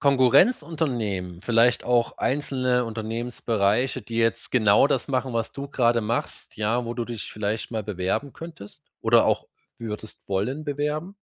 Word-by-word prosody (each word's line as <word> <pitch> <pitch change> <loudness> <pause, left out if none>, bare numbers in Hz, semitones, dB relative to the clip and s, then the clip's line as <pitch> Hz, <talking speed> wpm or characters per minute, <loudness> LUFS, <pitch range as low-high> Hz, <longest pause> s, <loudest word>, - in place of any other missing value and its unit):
Konkurrenzunternehmen 130 - +2
vielleicht 120 +2 +3
auch 120 -1 +1
einzelne 130 -3 0
Unternehmensbereiche, 115 +1 -1
die 115 +1 -7
jetzt 115 0 0
genau 110 +1 +5
das - - -1
machen, 130 -1 -1
was 115 -1 -1
du 140 0 -6
gerade 120 -3 +2
machst. 115 +2 -3
Ja, 115 +3 0
wo 115 - -4
du 120 -1 -2
dich 115 -3 -6
vielleicht 105 +1 -3
mal 110 - -2
bewerben 105 +7 -2
könntest 160 -12 -10 0.2
oder - - +5
auch - - 0 0.3
würdest 110 -1 -7
wollen 125 +11 -1
bewerben. 150 +6 -2
120 Hz, 145 wpm, -25 LUFS, 110-135 Hz, 0.3 s, genau